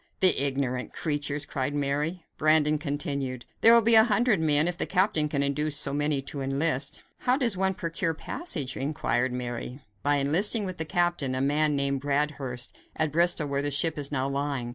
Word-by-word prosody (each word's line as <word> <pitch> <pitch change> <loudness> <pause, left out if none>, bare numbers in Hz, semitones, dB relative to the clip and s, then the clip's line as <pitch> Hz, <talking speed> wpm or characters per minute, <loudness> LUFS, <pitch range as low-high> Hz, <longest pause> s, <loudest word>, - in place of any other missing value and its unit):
"The 185 -7 +6
ignorant 135 -2 -2
creatures!" 145 -2 -2
cried 140 +1 -3
Mary. 145 +5 -2
Brandon 155 -1 +3
continued: 140 -4 -4 0.2
"There 230 - +8
will 235 -1 +6
be 230 +2 +5
a 220 -1 +9
hundred 240 -3 +2
men, 155 0 +3
if 175 - -1
the - - -3
captain 185 -5 +2
can 140 -1 0
induce 145 +1 0
so 140 -1 0
many 145 -1 0
to 140 +1 -7
enlist." 135 +1 -1 0.2
"How 250 +1 +1
does 240 -7 0
one 190 0 0
procure 165 -1 -3
passage?" 150 - -2
inquired 135 -3 -1
Mary. 125 +1 -5 0.2
"By 145 +1 +1
enlisting 185 - +2
with 185 -1 -6
the 160 - -3
captain, 175 -5 0
a - - -2
man 150 +2 +1
named 140 -1 0
Bradhurst, 140 -3 -2 0.2
at 155 -1 0
Bristol, 170 -1 +1
where 140 0 -1
the 145 - 0
ship 145 +3 +1
is 145 -1 -3
now 135 -2 -1
lying. 140 -3 -3
145 Hz, 185 wpm, -26 LUFS, 140-165 Hz, 0.2 s, a